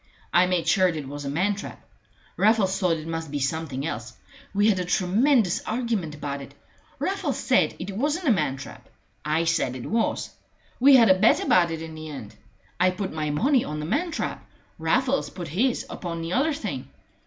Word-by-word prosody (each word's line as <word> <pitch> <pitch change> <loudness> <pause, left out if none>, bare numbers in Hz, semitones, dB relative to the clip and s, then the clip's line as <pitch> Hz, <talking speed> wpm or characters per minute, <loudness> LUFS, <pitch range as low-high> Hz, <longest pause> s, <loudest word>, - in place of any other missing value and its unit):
"I 175 +2 +5
made 180 -3 0
sure 185 -3 +4
it 155 -6 -3
was 145 +1 -6
a - - -2
man 185 +8 +1
trap. 200 - -8 0.6
Raffles 200 -3 +3
thought 180 -4 +2
it 155 - -8
must 165 -1 -4
be 145 - -3
something 140 -1 -2
else. 115 -6 -5 0.4
We 205 +1 +2
had 200 -4 +3
a - - 0
tremendous 200 +4 +2
argument 220 -10 -2
about 140 -1 -5
it. 135 - -11 0.4
Raffles 380 -8 -2
said 185 - +2
it 190 +2 -6
wasn't 300 - -1
a - - +6
man 150 -9 +1
trap. 140 - -11 0.3
I 155 +2 +1
said 165 -6 0
it 125 - -7
was. 230 +1 -1 0.5
We 275 +2 +7
had 230 -6 +7
a 185 - +3
bet 215 - +5
about 175 -2 +4
it 165 -1 -4
in 160 -1 -8
the 155 0 -8
end. 135 -8 -8 0.5
I 180 +1 +5
put 185 0 -4
my 155 -1 -2
money 250 - +2
on 150 0 -5
the 150 - -4
man 310 - 0
trap. 325 - -4 0.4
Raffles 255 +12 +1
put 175 -3 -7
his 235 - 0
upon 170 -2 -5
the 165 +2 -3
other 295 +5 +2
thing. 310 - -5
180 Hz, 200 wpm, -25 LUFS, 155-225 Hz, 0.6 s, We